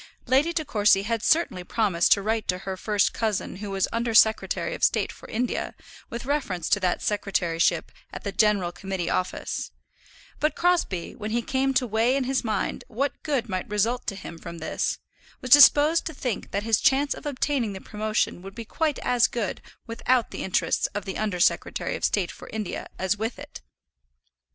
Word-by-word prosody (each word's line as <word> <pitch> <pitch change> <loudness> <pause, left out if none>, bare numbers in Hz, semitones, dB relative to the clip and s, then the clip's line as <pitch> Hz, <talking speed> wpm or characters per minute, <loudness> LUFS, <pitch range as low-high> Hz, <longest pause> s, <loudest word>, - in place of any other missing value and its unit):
Lady 270 +6 +3
De 320 -2 -2
Courcy 205 -6 +3
had 225 +1 -1
certainly 310 - +2
promised 180 -3 +1
to 200 - +5
write 220 0 -1
to 180 - +1
her 190 0 -5
first 205 +1 +1
cousin 215 -4 -2
who 205 +1 -6
was 195 -1 0
Under 230 0 -1
Secretary 220 - +3
of - - -7
State - - +2
for - - -14
India, 245 +3 -2 0.3
with 235 +1 -6
reference 230 - -2
to 205 - +3
that 185 -2 0
secretaryship 185 -5 0 0.2
at - - -8
the 200 - -3
General 205 -5 +2
Committee 180 -1 -4
Office; 185 0 -2 0.7
but 305 -1 +1
Crosbie, 340 - 0
when 215 -1 -6
he 235 +2 -1
came 270 +2 0
to 255 0 +3
weigh 230 +3 +2
in 275 - +1
his 265 +1 0
mind 215 -4 -2
what 270 +5 -2
good 270 -6 -1
might 185 -1 -4
result 225 +4 0
to 200 - -2
him 170 -3 -9
from 170 0 -8
this, 160 - -2 0.4
was 255 -2 -7
disposed 290 +3 +7
to 320 - -6
think 250 -6 -3
that 200 +1 -2
his 225 -1 +2
chance 280 +2 +3
of - - -8
obtaining 265 -5 -1
the 190 - -7
promotion 215 -3 -2
would 195 +1 -10
be 230 - -7
quite 310 +4 -1
as 245 -1 +3
good 225 -6 -3 0.2
without 235 +1 0
the - - -5
interest 190 - +1
of 205 -1 -3
the 190 - -5
Under 210 -4 -1
Secretary - - +1
of - - -7
State 190 -4 +1
for - - -12
India 215 -4 -4
as 190 +2 0
with 225 +3 -3
it. - - -10
220 Hz, 190 wpm, -25 LUFS, 195-255 Hz, 0.7 s, disposed